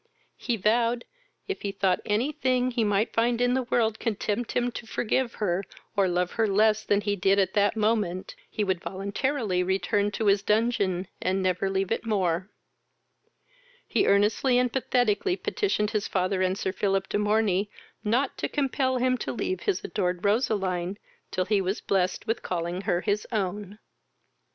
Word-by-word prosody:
He 240 Hz, -2 st, -1 dB
vowed, 230 Hz, +4 st, +1 dB, 0.4 s
if 395 Hz, -, -4 dB
he 200 Hz, -, -2 dB
thought 190 Hz, -2 st, +1 dB
any 225 Hz, +8 st, +1 dB
thing 255 Hz, -3 st, +1 dB
he 235 Hz, -2 st, 0 dB
might 205 Hz, +1 st, +1 dB
find 235 Hz, +1 st, +2 dB
in 245 Hz, 0 st, +2 dB
the 260 Hz, -, +2 dB
world 230 Hz, -3 st, 0 dB
could 225 Hz, -4 st, -2 dB
tempt 220 Hz, +3 st, -2 dB
him 245 Hz, 0 st, +1 dB
to 230 Hz, -, -8 dB
forgive 240 Hz, +2 st, -1 dB
her, 190 Hz, -2 st, 0 dB, 0.3 s
or 200 Hz, -2 st, +3 dB
love 180 Hz, 0 st, 0 dB
her 225 Hz, -1 st, +1 dB
less 215 Hz, +2 st, +3 dB
than 205 Hz, 0 st, +2 dB
he 205 Hz, 0 st, 0 dB
did 195 Hz, +1 st, +2 dB
at 190 Hz, -2 st, +2 dB
that 205 Hz, 0 st, +2 dB
moment, 210 Hz, -, 0 dB, 0.2 s
he 215 Hz, -, -2 dB
would 190 Hz, -3 st, -1 dB
voluntarily 200 Hz, +1 st, -1 dB
return 190 Hz, +2 st, +1 dB
to 220 Hz, -, -2 dB
his 200 Hz, -1 st, +4 dB
dungeon, 200 Hz, -4 st, +1 dB
and 190 Hz, +1 st, 0 dB
never 185 Hz, +1 st, +1 dB
leave 195 Hz, 0 st, -1 dB
it -, -, 0 dB
more: 190 Hz, -4 st, 0 dB, 1.4 s
he 400 Hz, -, +1 dB
earnestly 210 Hz, +6 st, +3 dB
and 250 Hz, -1 st, +1 dB
pathetically 250 Hz, -, +1 dB
petitioned 210 Hz, -, 0 dB
his 215 Hz, -2 st, -1 dB
father 185 Hz, 0 st, 0 dB
and 185 Hz, +1 st, +1 dB
Sir 190 Hz, -, -1 dB
Philip 195 Hz, -1 st, 0 dB
de -, -, -1 dB
Morney 210 Hz, -2 st, +1 dB, 0.3 s
not 245 Hz, +6 st, +1 dB
to -, -, -1 dB
compel 265 Hz, -2 st, 0 dB
him 255 Hz, 0 st, +1 dB
to -, -, -3 dB
leave 185 Hz, -5 st, -2 dB
his 180 Hz, -, -1 dB
adored 180 Hz, -1 st, -2 dB
Roseline 195 Hz, -4 st, 0 dB, 0.3 s
till 185 Hz, 0 st, -1 dB
he 205 Hz, 0 st, +2 dB
was 190 Hz, +2 st, -1 dB
blessed 185 Hz, -2 st, 0 dB
with 225 Hz, -, -1 dB
calling 175 Hz, +1 st, -3 dB
her 175 Hz, -, +2 dB
his 205 Hz, +2 st, -1 dB
own. 205 Hz, -1 st, -3 dB
205 Hz, 175 wpm, -27 LUFS, 190-230 Hz, 1.4 s, his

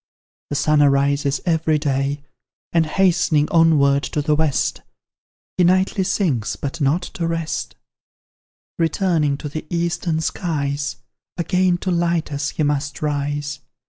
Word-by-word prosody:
The -, -, -3 dB
sun 150 Hz, +1 st, +3 dB
arises 140 Hz, 0 st, +2 dB
every 160 Hz, -2 st, +2 dB
day, 140 Hz, -1 st, -1 dB, 0.5 s
And 165 Hz, -2 st, +3 dB
hastening 160 Hz, -4 st, +2 dB
onward 145 Hz, -4 st, +4 dB
to 150 Hz, -, -2 dB
the 150 Hz, 0 st, +2 dB
West, 150 Hz, -2 st, 0 dB, 0.8 s
He 180 Hz, -, +4 dB
nightly 185 Hz, +2 st, +2 dB
sinks, 150 Hz, -, 0 dB
but 140 Hz, +3 st, -5 dB
not 145 Hz, +6 st, +2 dB
to 170 Hz, -, -4 dB
rest: 165 Hz, -1 st, -3 dB, 1.0 s
Returning 165 Hz, -3 st, +1 dB
to 150 Hz, -, -6 dB
the 155 Hz, +2 st, -6 dB
eastern 170 Hz, -1 st, -1 dB
skies, 145 Hz, -5 st, -2 dB, 0.4 s
Again 180 Hz, +1 st, +1 dB
to 185 Hz, -, -1 dB
light 170 Hz, -2 st, 0 dB
us, 145 Hz, +1 st, -2 dB
he 155 Hz, -, -2 dB
must 145 Hz, 0 st, -1 dB
rise. 145 Hz, 0 st, -2 dB
150 Hz, 130 wpm, -21 LUFS, 145-170 Hz, 1.0 s, onward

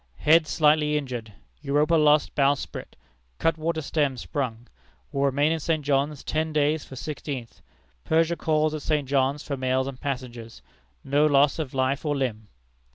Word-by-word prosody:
Head 155 Hz, +1 st, +4 dB
slightly 150 Hz, -1 st, +3 dB
injured. 125 Hz, -6 st, -5 dB, 0.3 s
Europa 150 Hz, +4 st, +1 dB
lost 150 Hz, -2 st, +4 dB
bowsprit, 140 Hz, 0 st, -1 dB, 0.4 s
cutwater 160 Hz, -, 0 dB
stem 140 Hz, -2 st, 0 dB
sprung. 120 Hz, -4 st, -4 dB, 0.5 s
Will 140 Hz, -1 st, 0 dB
remain 145 Hz, +3 st, +2 dB
in 165 Hz, -, 0 dB
St. 155 Hz, -2 st, -1 dB
John's 140 Hz, 0 st, 0 dB
ten 155 Hz, +1 st, -1 dB
days 150 Hz, 0 st, +1 dB
from 130 Hz, -, -11 dB
sixteenth. 140 Hz, -4 st, -6 dB, 0.4 s
Persia 165 Hz, +1 st, +2 dB
calls 155 Hz, -1 st, +1 dB
at 155 Hz, -, -4 dB
St. 150 Hz, -3 st, -1 dB
John's 135 Hz, +1 st, +1 dB
for 140 Hz, -2 st, -4 dB
mails 130 Hz, 0 st, 0 dB
and 135 Hz, -2 st, -7 dB
passengers. 120 Hz, -, -6 dB, 0.4 s
No 145 Hz, +2 st, +3 dB
loss 145 Hz, +1 st, +3 dB
of 140 Hz, -4 st, -4 dB
life 130 Hz, +1 st, 0 dB
or 150 Hz, -2 st, 0 dB
limb." 110 Hz, -6 st, -3 dB
145 Hz, 155 wpm, -25 LUFS, 130-155 Hz, 0.5 s, Head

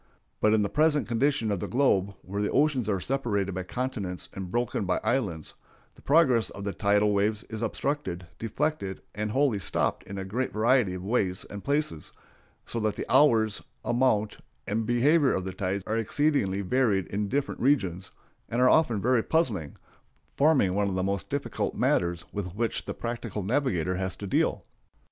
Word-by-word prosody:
But 110 Hz, 0 st, +4 dB
in 105 Hz, -, +2 dB
the -, -, +1 dB
present 150 Hz, -1 st, +2 dB
condition 120 Hz, -1 st, +1 dB
of 100 Hz, -, -1 dB
the -, -, -3 dB
globe, 100 Hz, -7 st, +2 dB
where 100 Hz, +2 st, -4 dB
the 105 Hz, -, 0 dB
oceans 140 Hz, -7 st, +2 dB
are 100 Hz, -2 st, +1 dB
separated 100 Hz, -5 st, -1 dB
by 95 Hz, -, -3 dB
continents 100 Hz, -3 st, -4 dB
and 95 Hz, -2 st, -6 dB
broken 120 Hz, +1 st, -1 dB
by 90 Hz, -1 st, +1 dB
islands, 90 Hz, -, -1 dB, 0.4 s
the -, -, -19 dB
progress 135 Hz, -7 st, +4 dB
of 100 Hz, -, -8 dB
the 100 Hz, -1 st, -2 dB
tidal 105 Hz, 0 st, +2 dB
waves 105 Hz, +1 st, +1 dB
is 110 Hz, 0 st, -5 dB
obstructed, 115 Hz, -6 st, -2 dB
deflected, 115 Hz, -3 st, -2 dB
and 105 Hz, +1 st, -3 dB
wholly 130 Hz, -2 st, +2 dB
stopped 90 Hz, -, 0 dB
in 100 Hz, -, -7 dB
a 95 Hz, -, -4 dB
great 120 Hz, +7 st, -2 dB
variety 110 Hz, -3 st, +2 dB
of 90 Hz, -, -7 dB
ways 95 Hz, -4 st, 0 dB
and 100 Hz, 0 st, -7 dB
places, 140 Hz, -, -1 dB, 0.5 s
so 115 Hz, -, -4 dB
that 110 Hz, -1 st, 0 dB
the -, -, -4 dB
hours, 115 Hz, -7 st, +4 dB, 0.2 s
amount, 120 Hz, -4 st, +1 dB, 0.3 s
and 110 Hz, +2 st, -1 dB
behavior 135 Hz, +4 st, +3 dB
of 95 Hz, -, -2 dB
the 95 Hz, -, -4 dB
tides 95 Hz, +1 st, -2 dB
are 110 Hz, -, -1 dB
exceedingly 115 Hz, -5 st, +1 dB
varied 100 Hz, -2 st, +1 dB
in 105 Hz, 0 st, -1 dB
different 140 Hz, +4 st, -2 dB
regions, 95 Hz, -10 st, +1 dB, 0.4 s
and 120 Hz, -, -1 dB
are 125 Hz, 0 st, +6 dB
often 120 Hz, -10 st, +3 dB
very 125 Hz, -1 st, +3 dB
puzzling, 110 Hz, -, 0 dB, 0.6 s
forming 140 Hz, -11 st, +3 dB
one 100 Hz, 0 st, +1 dB
of 95 Hz, -, -3 dB
the 95 Hz, -, 0 dB
most 100 Hz, +1 st, -2 dB
difficult 140 Hz, 0 st, -2 dB
matters 85 Hz, 0 st, +1 dB
with 95 Hz, -3 st, -4 dB
which 115 Hz, +1 st, -1 dB
the -, -, -4 dB
practical 115 Hz, -4 st, -4 dB
navigator 95 Hz, -, 0 dB
has 95 Hz, 0 st, -2 dB
to 100 Hz, -, -7 dB
deal. 95 Hz, -, +1 dB
105 Hz, 180 wpm, -27 LUFS, 95-130 Hz, 0.6 s, are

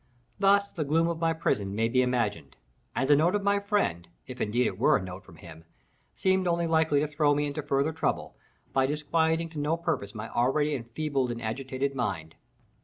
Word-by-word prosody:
Thus 200 Hz, 0 st, +4 dB
the 160 Hz, -, -3 dB
gloom 160 Hz, +3 st, +2 dB
of 170 Hz, -1 st, -2 dB
my 165 Hz, 0 st, +2 dB
prison 100 Hz, -12 st, -1 dB
may 115 Hz, +1 st, +2 dB
be 130 Hz, +2 st, +2 dB
imagined, 115 Hz, -, -1 dB, 0.4 s
and 135 Hz, -, 0 dB
the 145 Hz, -, +6 dB
note 170 Hz, +7 st, +3 dB
of 205 Hz, -, -1 dB
my 200 Hz, 0 st, +2 dB
friend, 200 Hz, -, -1 dB, 0.2 s
if 125 Hz, -1 st, -8 dB
indeed 120 Hz, +4 st, +1 dB
it -, -, -2 dB
were -, -, +5 dB
a -, -, -5 dB
note 95 Hz, +1 st, -8 dB
from 95 Hz, -4 st, -16 dB
him, 80 Hz, 0 st, -13 dB, 0.5 s
seemed 190 Hz, -1 st, +1 dB
only 170 Hz, 0 st, +1 dB
likely 160 Hz, -3 st, +2 dB
to 150 Hz, -, 0 dB
throw 145 Hz, -1 st, +2 dB
me 145 Hz, +1 st, 0 dB
into 145 Hz, +1 st, -3 dB
further 140 Hz, +2 st, 0 dB
trouble, 155 Hz, -2 st, -2 dB, 0.4 s
by 135 Hz, 0 st, +3 dB
disquieting 160 Hz, +3 st, 0 dB
to 160 Hz, -2 st, -7 dB
no 150 Hz, +3 st, 0 dB
purpose 100 Hz, -11 st, -3 dB
my 110 Hz, +1 st, -5 dB
already 145 Hz, +5 st, +1 dB
enfeebled 135 Hz, +1 st, -2 dB
and 120 Hz, -1 st, -4 dB
agitated 130 Hz, +4 st, -3 dB
mind. 95 Hz, -11 st, -3 dB
145 Hz, 200 wpm, -28 LUFS, 115-160 Hz, 0.5 s, the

